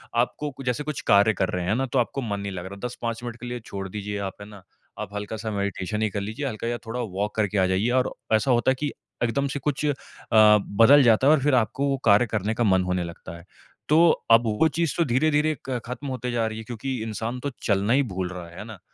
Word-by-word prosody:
आपको 125 +5 0
कुछ 135 0 -11
जैसे 125 +3 -1
कुछ 150 -1 -4
कार्य 100 +2 +5
कर 95 -1 -1
रहे 90 -1 -2
हैं 100 +5 +1
ना, 135 +2 0
तो 130 0 0
आपको 130 +3 -1
मन 105 -5 -3
नहीं 100 0 -4
लग 90 -2 -6
रहा। 100 +2 -8
10-5 115 0 -5
मिनट 120 -1 -5
के - - -8
लिए 120 0 -4
छोड़ 95 -1 -5
दीजिए 105 +1 -5
आप, 95 -1 -4
है 100 - -9
ना? 100 -2 -12 0.4
आप 105 -1 -6
हल्का-सा 110 +2 -4
मेडिटेशन 100 0 -2
ही 110 - +1
कर 100 - -3
लीजिए, 110 +8 -4
हल्का 115 -1 -4
या 120 - -1
थोड़ा 120 +2 -4
वॉक 105 -1 -3
करके 105 -1 0
आ 95 - +4
जाइए 95 +5 +1
और 125 - -1 0.2
ऐसा 110 +4 +3
होता 120 +1 +3
है - - 0
कि 145 -1 -1 0.3
एकदम 140 +4 0
से 140 +1 -4
कुछ 150 +2 -2
अ, 145 - +2 0.4
बदल 110 +5 +6
जाता 120 +3 +4
है 150 - +7
और 155 - +3
फिर 145 -3 +3
आपको 125 +4 +1
वो 135 - 0
कार्य 100 +4 +6
करने 110 0 -1
का 120 - 0
मन 95 -4 +3
होने 90 -1 -1
लगता 85 0 -9
है। 85 - -15 0.4
तो 165 +3 +6 0.2
अब 115 +1 +7
वो 110 +9 +2
चीज़ 165 -3 0
तो 170 - +3
धीरे-धीरे 150 +4 +2
क 125 -2 -1
खत्म 125 +4 -6
होते 125 -2 -3
जा 115 -2 0
रही 110 - -5
है 110 - -6
क्योंकि 120 +2 -4
इंसान 115 +3 -4
तो 140 +3 -3
चलना 100 +2 +2
ही 140 +1 +4
भूल 90 -1 -2
रहा 90 -2 -7
है, 85 - -14
है - - -6
ना? 110 -4 -10
115 Hz, 260 wpm, -25 LUFS, 100-130 Hz, 0.4 s, है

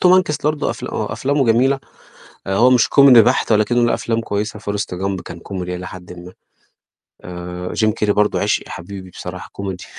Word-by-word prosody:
توم 180 - +5
هانكس 180 -6 +2
برضه 150 -1 0
أفل - - -6
آه - - -3
أفلامه 140 +1 0
جميلة، 130 +4 +3 0.7
آآ 95 - 0
هو 120 +5 +5
مش 125 -3 +4
كوميدي 135 -5 +8
بحت 120 +1 +1
ولكنّه 110 +3 +3
له - - +1
أفلام 115 0 -1
كويسة 105 0 -3
forrest 100 -3 -3
gump 95 -2 -2
كان 85 - -8
كوميدي 90 -1 -5
إلى 90 +1 -7
حدٍ 90 -1 -10
ما. 90 +1 -11 0.9
آآ 90 0 -7
جيم 110 -1 +2
كيري 105 -1 0
برضه 105 0 +1
عشقي، - - 0
حبيبي 95 +2 -8
بصراحة - - -8
كوميدي. 95 -2 -6
105 Hz, 185 wpm, -19 LUFS, 90-120 Hz, 0.9 s, كوميدي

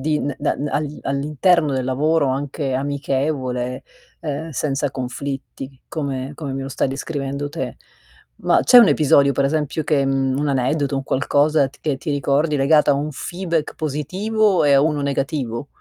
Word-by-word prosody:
di 150 +2 0 0.2
da 145 - 0 0.2
all 150 0 -2
all'interno 150 +3 +1
del 130 -1 -1
lavoro, 145 +3 +1
anche 135 0 -2
amichevole, 135 -2 -2 0.4
ehm, 155 +1 -4
senza 145 -1 -1
conflitti, 135 +1 -6
come 140 -3 -4
come 145 -2 -5
me 135 0 -3
lo 135 - -5
stai 135 - -1
descrivendo 140 0 -4
te. 160 +3 -5 0.6
Ma - - +2
c'è 250 - +6
un 235 - +8
episodio, 140 -2 +4
per 140 +1 0
esempio 155 +1 -1
che, 145 -2 +1
mhmm 135 -1 0
un 150 0 0
aneddoto, 140 +2 0
un 135 - -3
qualcosa 145 +1 +2
che 145 0 -3
ti 150 +3 -5
ricordi 145 +2 +1
legato 150 +2 +4
a - - +4
un 150 +2 -2
feedback 170 +1 -3
positivo 185 +8 0
e 145 - +4
a 135 - +6
uno 150 -1 +1
negativo? 140 -3 -2
140 Hz, 160 wpm, -21 LUFS, 135-155 Hz, 0.6 s, un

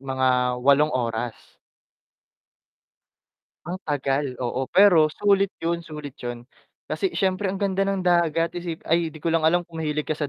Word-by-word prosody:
mga 130 -2 +1
8 140 +2 +5
oras. 120 -3 -4 2.1
Ang 180 +3 -5
tagal. 140 -2 -1
Oo, 130 +2 -2
pero 180 -6 +6
sulit 200 +4 +2
yun 170 +1 -2
sulit 150 -4 -8
yun, 120 -1 -6 0.4
kasi 385 -2 -2
syempre 190 +1 0
ang 195 - -2
ganda 195 -1 -1
ng 195 -2 -1
dagat. 170 -2 +2
Isip 175 -2 -6
ay 165 0 +1
'di 160 - -12
ko 165 - +1
lang 165 - +3
alam 170 +3 +2
kung 165 -1 -9
mahilig 150 -1 -2
ka - - -1
sa 150 -2 -3
160 Hz, 160 wpm, -24 LUFS, 135-175 Hz, 2.1 s, pero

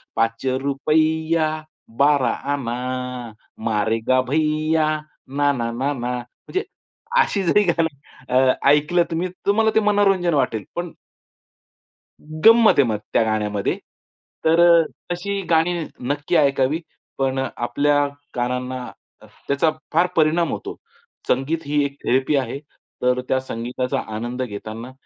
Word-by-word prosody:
पाच 115 +2 0 0.2
रुपय्या, 155 +3 +1 0.5
बारा 140 -1 +4 0.2
आना, 125 -1 -4 0.3
मारेगा 115 +3 +1
भैया, 155 +1 +1 0.4
ना, 145 +2 +1
ना, 115 -3 -2
ना, 130 +4 -1
ना 125 -1 -3
म्हणजे 125 - -5 0.6
अशी 200 - 0
जरी 205 +4 +4
गाणं 165 -3 +2 0.4
अ, 130 +1 +4 0.2
ऐकलं 150 +4 +4
तुम्ही 165 +3 -1 0.2
तुम्हाला 220 +2 +3
ते - - +6
मनोरंजन 200 -4 +2
वाटेल. 115 -7 0
पण 175 -1 -3 1.5
गंमत 225 0 +8
आहे - - +7
मग 110 -2 0 0.2
त्या - - +4
गाण्यामध्ये. 105 -2 -1 0.7
तर 160 +1 +4 0.5
तशी 200 +3 -2
गाणी 165 +1 +3 0.4
नक्की 145 +4 -1
ऐकावी, 140 +1 +2 0.4
पण 135 -1 0 0.2
आपल्या 145 +4 +1 0.3
कानांना 125 +1 -2 0.6
त्याचा 140 +3 +2 0.2
फार 170 +3 +4
परिणाम 165 +1 +2
होतो. - - -5 0.5
संगीत 150 +6 0
ही 145 0 +1
एक 140 0 -5
थेरपी 130 +4 +2
आहे. 135 -1 -1 0.4
तर, 125 0 +2
त्या 130 - +2
संगीताचा 125 0 -3 0.2
आनंद 120 +3 -4
घेताना 110 +2 -7
140 Hz, 115 wpm, -21 LUFS, 125-160 Hz, 1.5 s, गंमत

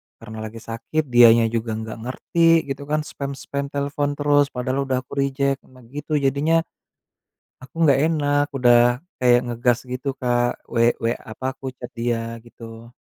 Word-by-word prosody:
Karena 110 -1 -10
lagi 110 +1 -7
sakit, 115 +7 -3
dianya 115 -1 +7
juga 115 -1 -2
nggak 110 0 -6
ngerti, 165 +7 +2
gitu 140 +1 -6
kan. 150 +1 0
Spam-spam 140 -1 -5
telepon 145 +1 -2
terus. 145 -1 +3
Padahal 130 +1 -2
udah 130 -1 -1
aku - - -13
reject. 140 0 0
Nah, 130 -1 -18
gitu 150 +2 -3
jadinya 145 +4 +2 1.0
aku 130 - -14
nggak 140 -2 +5
enak, 145 -2 +1
udah 120 -1 +5 0.2
kayak 120 -1 +5
ngegas 120 0 +1
gitu 125 +2 -5
Kak. 120 -1 0
We 115 0 +3
we 115 +1 0
apa 110 +4 -11
aku 135 0 -6
chat 125 - -8
dia, 115 -1 -3
gitu. 115 0 -12
130 Hz, 155 wpm, -22 LUFS, 120-140 Hz, 1.0 s, dianya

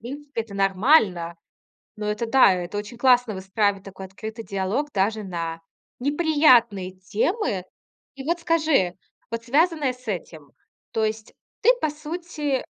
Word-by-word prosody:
принципе, 280 0 -5
это 210 -3 -12
нормально. 195 - +3 0.6
Но 210 0 -4
это 210 +2 -1
да, 230 -4 +6
это 180 +3 -4
очень 210 +3 -6
классно 245 -3 +4
выстраивать, 195 +1 0
такой 190 -1 -9
открытый 220 +4 -8
диалог 200 +10 -1
даже 210 +2 0
на 165 -3 -4 0.4
неприятные 255 - +3
темы. 205 - -1 0.5
И 270 - -8
вот 340 +4 0
скажи, 315 - +2 0.4
вот 230 0 -3
связанное 295 +1 +2
с 250 -1 -20
этим, 160 -7 -6 0.4
то 220 - 0
есть 215 0 -4 0.3
ты 470 - +5
по 310 - +1
сути 300 -3 -3
225 Hz, 135 wpm, -24 LUFS, 195-290 Hz, 0.6 s, да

